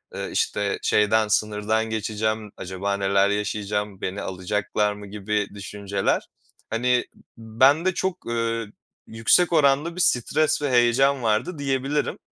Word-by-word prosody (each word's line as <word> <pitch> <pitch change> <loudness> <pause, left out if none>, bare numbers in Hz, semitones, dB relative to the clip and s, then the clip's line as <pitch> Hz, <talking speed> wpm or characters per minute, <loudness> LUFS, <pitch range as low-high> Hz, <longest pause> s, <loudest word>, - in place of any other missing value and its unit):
ııı, - - -4
işte, 100 -1 -1
şeyden, 110 +1 +3
sınırdan 105 +1 0
geçeceğim, 110 0 -2
acaba 95 +2 -3
neler 100 0 +2
yaşayacağım, 105 -1 -2
beni 95 +2 -3
alacaklar 105 +3 -1
mı, 105 0 -10
gibi 105 +1 -2
düşünceler. 100 0 -2 0.4
Hani, 125 +2 +1
b - - -21 0.2
bende 130 +11 +3
çok, 185 0 -3
ııı, 115 -1 -2 0.4
yüksek 115 +11 +3
oranda 150 +2 +3
bir 180 - -1
stres 155 +1 +2
ve 145 - 0
heyecan 125 +2 +3
vardı 115 +10 0
diyebilirim. 140 +1 -1
110 Hz, 125 wpm, -24 LUFS, 105-130 Hz, 0.4 s, şeyden